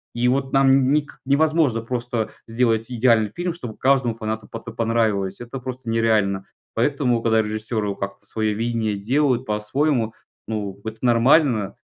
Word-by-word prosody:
И 120 +1 +1
вот 135 +1 0
нам 135 -1 +4
ник 150 0 -1
невозможно 145 -3 +2
просто 120 -1 -3 0.2
сделать 115 0 0
идеальный 115 -3 +3
фильм, 175 0 -2
чтобы 120 -10 -8
каждому 130 -3 +2
фанату 110 -1 -4
потэ 115 0 -8
понравилось. 110 -4 0
Это 120 +2 -7
просто 130 -1 -6
нереально, 110 -4 +1 0.3
поэтому 125 -1 +1
когда 110 -1 +3
режиссеры 110 -1 -3
как-то 100 +1 -6
свое 110 -1 -1
видение 115 -1 -1
делают 130 +4 +1
по-своему, 115 +3 0 0.3
ну, 100 -3 -4
вот 110 - -4
это - - -22
нормально. 120 -2 +3
115 Hz, 145 wpm, -22 LUFS, 110-130 Hz, 0.3 s, нам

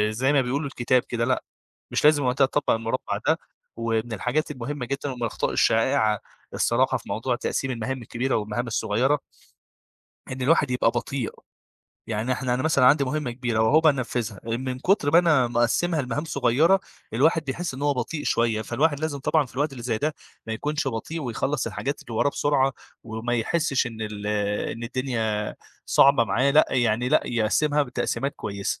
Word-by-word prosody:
زي 130 +6 +1
ما 140 - +4
بيقولوا 135 +4 -1
الكتاب 130 -2 +1
كده 115 -1 -1
لأ، 130 +1 0 0.5
مش - - 0
لازم 150 -2 +5
وقتها 130 +2 +3
تطبّق 145 +2 0
المُربّع 115 +3 -1
ده، - - +4 0.4
ومن 115 0 -2
الحاجات 125 +9 -1
المهمة 130 0 -5
جدًا 140 +2 -3
ومن 125 -1 -8
الأخطاء 115 - -1
الشائعة 110 -2 +2 0.3
الصراحة - - +2
في - - -14
موضوع - - -1
تقسيم 135 -1 -2
المهام 125 +2 -3
الكبيرة 120 +3 -2
والمهام 110 +3 -2
الصغيرة 115 +6 +1 1.1
إن 130 - -5
الواحد 145 0 +3
يبقى 125 - +2
بطيء. 120 0 -3 0.8
يعني 110 +3 -1
إحنا 125 -1 -1
أنا 125 - -1
مثلًا 155 -5 +3
عندي 140 +1 +5
مهمة 140 0 -2
كبيرة 120 -2 -1
وهو 150 +8 +5
بقى 160 -2 +5
نفّذها 120 -5 -3
آآ 115 - +1
من 130 0 -4
كُتر 155 -1 +2
ما 165 - +6
أنا 155 -8 +4
مقسّمها 145 +8 +1
لمهام 145 +4 -3
صغيرة، 155 +6 +3 0.3
الواحد 155 +6 +3
بيحس 140 +2 -3
إن 140 - -7
هو 145 -1 +2
بطيء 145 +5 -3
شوية، 115 -2 +1
فالواحد 145 +5 0
لازم 155 -2 -2
طبعًا 145 +1 +1
في - - -18
الوقت 145 +2 0
اللي 120 -3 -8
زي 115 -2 -1
ده 150 +1 -1 0.3
ما 110 - -3
يكونش 145 +5 -2
بطيء 135 +7 -4
ويخلّص 130 +2 -2
الحاجات 135 +5 -3
اللي 115 - -8
وراه 145 - +3
بسرعة 135 -2 +1 0.3
وما 115 +2 -3
يحسّش 135 +2 +1
إن 115 -2 -7
ال 105 -1 -5 0.5
إن 115 - -8
الدنيا 115 -4 -2 0.3
صعبة 135 -4 +5
معاه، 120 +7 +2
لأ، 150 +2 +5
يعني 120 -1 +1
لأ - - +4
يقسّمها 145 +6 +2
بتقسيمات 140 +1 -2
كويسة. 100 -1 -3
130 Hz, 175 wpm, -25 LUFS, 115-145 Hz, 1.1 s, ما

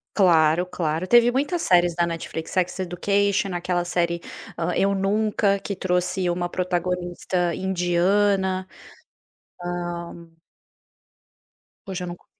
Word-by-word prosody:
Claro, 170 -2 +4
claro, 165 0 -2
teve 240 +2 +6
muitas 290 +7 -1
séries 175 -1 +3
na 170 0 +2
Netflix, 165 -1 -5
Sex 180 -1 0
Education, 200 +1 0
aquela 175 0 -1
série, 170 -1 -1 0.6
Eu 200 0 +2
Nunca, 200 +1 +1
que 200 - -5
trouxe 180 0 0
uma 175 0 -1
protagonista 180 0 -1
indiana. 190 +1 +1 1.0
Hã. 175 -1 -5 1.6
Hoje 190 -2 -4
eu - - -5
não 175 - -5
co - - -28
180 Hz, 110 wpm, -24 LUFS, 175-195 Hz, 1.6 s, teve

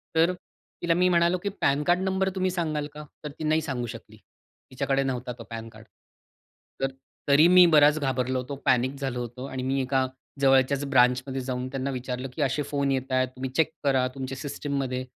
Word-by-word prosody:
तर 165 +3 +4
तिला 175 -1 -5
मी 180 +2 +3
म्हणालो, 170 0 +3
की 200 +3 -3
पॅनकार्ड 150 +6 +2
नंबर 190 0 0
तुम्ही 185 0 +1
सांगाल 155 -5 -2
का? 150 - -8 0.2
तर 150 - -4
ती - - -4
नाही 155 +1 +2
सांगू 130 -6 -3
शकली. 110 -1 -10 0.5
तिच्याकडे 135 +1 0
नव्हता 125 -2 -3
तो - - -7
पॅनकार्ड. 115 -1 -9 1.0
तर 135 0 0 0.4
तरी 145 +4 +7
मी 180 0 +8
बराच 150 +1 +6
घाबरलो 130 -2 0
होतो. 130 +3 -5
पॅनिक 130 0 +2
झालो 135 -3 -3
होतो. 120 +2 -7
आणि 130 -2 -5
मी 135 +1 0
एका 130 0 +1 0.4
जवळच्याच 135 +1 +3
ब्रांचमध्ये 130 +1 +2
जाऊन 125 0 -3
त्यांना 135 0 -3
विचारलं, 125 0 -4
की 155 - -4
असे 140 +1 +1
फोन 140 -1 0
येताहेत 130 -1 0
तुम्ही 130 +1 -4
चेक 160 -1 +2
करा 135 -3 +2
तुमच्या 135 0 -5
सिस्टममध्ये. 135 -2 -3
135 Hz, 180 wpm, -26 LUFS, 130-150 Hz, 1.0 s, मी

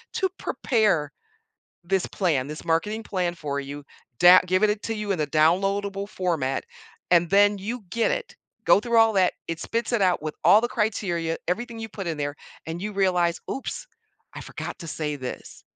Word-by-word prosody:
to 380 - +2
prepare 205 - +1 0.7
this 190 +1 0
plan, 150 -9 0
this 150 0 -7
marketing 210 +7 0
plan 180 -4 -1
for 140 -3 -3
you, 140 +1 -8 0.3
dow 180 +1 +9
give 185 +3 +2
it 210 0 +1
to 225 - -3
you 210 -2 -2
in 180 - -2
a 150 - +1
downloadable 195 +6 +1
format, 165 -10 -1 0.5
and 170 0 +4
then 205 +1 +5
you 220 +4 -5
get 230 -1 +1
it. - - -3 0.3
Go - - +6
through 235 +1 0
all 225 -1 +6
that, 185 -2 +3
it 165 -1 -4
spits 230 +1 -2
it 235 -4 +2
out 180 -2 +3
with 155 -1 -4
all 210 - +7
the 240 - 0
criteria, 175 -8 -1
everything 230 +6 -3
you 225 0 -5
put 195 -3 -7
in 165 - -2
there, 145 -1 -3 0.3
and 165 +2 -5
you 210 +1 -3
realize, 180 -3 +1
'Oops, - - -5 0.5
I - - -7
forgot - - -7
to 165 - -8
say 150 -1 -3
this'" 130 -2 -8
185 Hz, 185 wpm, -25 LUFS, 165-210 Hz, 0.7 s, dow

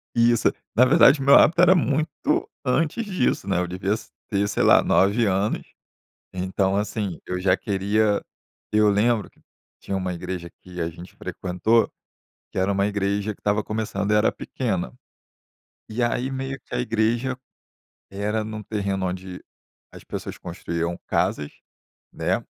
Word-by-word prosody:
Isso. 120 0 +4 0.2
Na 125 - +6
verdade, 140 0 +6
o - - -1
meu 140 +1 +7
hábito 170 +3 +6
era 180 +1 +7
muito 155 -2 0 0.2
antes 160 - 0
disso, 180 - 0
né, 95 -2 +1
eu 90 - -1
devia 95 +3 -1
s 110 - -6 0.2
ter, 100 -1 +1
sei 100 - 0
lá, - - +6
9 100 +5 +3
anos. 100 +1 0 0.7
Então, 95 +1 0
assim, 105 -3 -2
eu 90 0 -3
já 90 0 +3
queria 100 +1 +1 0.5
eu 105 0 +4
lembro 110 +2 +2
que - - -30 0.4
tinha 100 - -4
uma 95 -1 -2
igreja 90 0 -5
que 90 0 -9
a 85 - -1
gente 85 +3 -12
frequentou, 95 +6 +1 0.6
que - - -5
era 95 +2 +2
uma 100 +1 +1
igreja 100 +1 -1
que - - -28
estava 105 0 +1
começando 105 -2 -2
e - - +5
era 105 +1 +3
pequena. 95 - -3 1.0
E 120 +3 -1
aí 120 +2 0
meio 135 0 -4
que - - -7
a - - 0
igreja 120 +2 0 0.7
era 105 +2 -2
num 110 -1 -6
terreno 100 -3 -2
onde 90 0 -6 0.5
as - - -12
pessoas - - -6
construíam 85 0 -4
casas, 75 0 0 0.6
né, - - -1
105 Hz, 155 wpm, -24 LUFS, 95-115 Hz, 1.0 s, meu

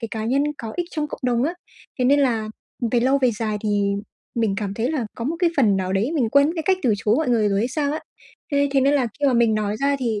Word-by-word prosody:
cái 230 - -4
cá 220 -1 -4
nhân 270 +5 +2 0.2
có 225 -2 -6
ích 350 -1 -1
trong 300 -1 -2
cộng - - -8
đồng 240 -1 +1
á. 335 +5 -1 0.4
Thế 250 - +1
nên 285 +3 +4
là 225 -5 +1 0.4
về 240 - +3
lâu 265 +3 +3
về 250 - +5
dài 215 -2 -1
thì 205 -1 +1 0.4
mình 225 -4 0
cảm 200 -2 -3
thấy 235 +6 -1
là 260 -8 -2
có 230 - -5
một 325 +5 -1
cái 350 -2 +2
phần 210 -8 +4
nào 185 0 -2
đấy 215 +11 0
mình 245 -7 +1
quên 280 0 +5
mất 325 - -1
cái 320 - -1
cách 375 +3 +2
từ 235 -5 +3
chối 215 +3 +1
mọi 315 -5 0
người 220 -4 +3
rồi 200 0 +1
hay 235 +4 0
sao 290 +1 -1
á. 310 - -3 0.5
Thế 285 0 +2
thế 275 - +3
nên 280 +2 +3
là 260 -4 +2
khi 285 - +3
mà 265 - +3
mình 235 -2 +3
nói 210 0 -1
ra 280 +3 +1
thì 225 -5 -1
245 Hz, 295 wpm, -22 LUFS, 215-280 Hz, 0.5 s, về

